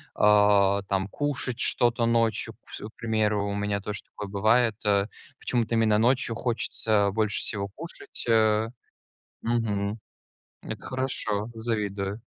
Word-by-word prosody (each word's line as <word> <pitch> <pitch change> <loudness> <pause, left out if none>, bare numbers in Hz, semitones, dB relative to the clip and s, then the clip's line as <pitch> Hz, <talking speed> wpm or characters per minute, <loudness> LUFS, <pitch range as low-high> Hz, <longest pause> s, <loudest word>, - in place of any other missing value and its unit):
а, 105 -1 +5
там 95 0 0
кушать 130 -2 -2
что-то 120 -1 +2
ночью 115 -2 +1
вс - - -9
К 105 - -6
примеру, 110 -3 0
у - - -2
меня 100 0 -1
тоже 105 0 -4
такое 105 - -8
бывает. 110 +3 +3
Э, 100 -1 +3 0.3
почему-то 115 -2 0
именно 110 -2 +3
ночью 120 0 +2
хочется 110 -3 0
больше 110 -1 +1
всего 100 -1 -1
кушать, 165 +11 -8
э. 110 -1 +3 0.7
Мгм. 110 -2 -1 0.6
Это - - -6
хорошо, 120 -5 -2
завидую. 105 -2 -3
110 Hz, 125 wpm, -26 LUFS, 100-115 Hz, 0.7 s, а